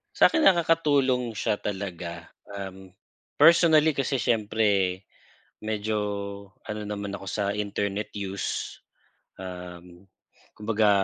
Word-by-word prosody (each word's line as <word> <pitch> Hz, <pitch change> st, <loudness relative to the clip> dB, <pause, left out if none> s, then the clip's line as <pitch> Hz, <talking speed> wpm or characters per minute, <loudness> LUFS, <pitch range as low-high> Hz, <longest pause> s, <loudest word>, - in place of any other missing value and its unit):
Sa'kin 320 Hz, -, +5 dB
nakakatulong 145 Hz, -, +3 dB
siya 105 Hz, -, 0 dB
talaga, 90 Hz, -4 st, -5 dB, 0.2 s
umh, 95 Hz, -2 st, -8 dB, 0.4 s
personally 160 Hz, 0 st, +6 dB
kasi 135 Hz, -1 st, -1 dB
siyempre 105 Hz, -4 st, +1 dB, 0.6 s
medyo 110 Hz, 0 st, -1 dB, 0.7 s
ano 105 Hz, 0 st, -4 dB
naman 100 Hz, -1 st, -4 dB
ako 95 Hz, -, -9 dB
sa 105 Hz, +2 st, -1 dB
internet 100 Hz, 0 st, -2 dB
use, 100 Hz, -1 st, -4 dB, 0.6 s
uhm, 90 Hz, 0 st, -9 dB, 0.5 s
kumbaga 105 Hz, 0 st, +2 dB
105 Hz, 90 wpm, -26 LUFS, 95-120 Hz, 0.7 s, personally